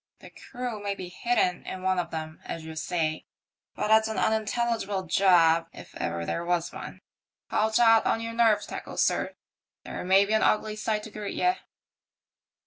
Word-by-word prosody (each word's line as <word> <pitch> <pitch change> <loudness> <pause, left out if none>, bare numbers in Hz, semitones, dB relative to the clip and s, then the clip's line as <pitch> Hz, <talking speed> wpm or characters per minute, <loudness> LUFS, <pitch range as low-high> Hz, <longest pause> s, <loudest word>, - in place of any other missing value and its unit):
The - - -13
crew 245 -4 -6
may 200 -1 -2
be 185 -2 -7
hidden 180 -2 0
in 185 0 -7
one 185 -1 +1
of 170 -1 -2
them, 155 -1 -6
as 165 -1 -6
you 160 0 -8
say; 155 -1 -2 0.5
but 210 - -1
it's 220 0 +5
an 220 - -4
unintelligible 220 -2 0
job, 170 -3 +4
if - - -12
ever 85 0 -3
there 170 - -2
was 170 -1 -1
one. - - -8 0.5
Haul 215 +1 +2
taut 225 0 +5
on - - +1
your 230 0 -5
nerve 230 -2 +3
tackles, - - -3
sir, - - +1
for - - -15 0.5
there - - -5
may 190 +2 +5
be 210 - -2
an 220 - +3
ugly 215 0 +2
sight 215 0 -2
to 220 - -9
greet 210 -1 -5
ye." 360 0 +3
200 Hz, 185 wpm, -27 LUFS, 175-220 Hz, 0.5 s, it's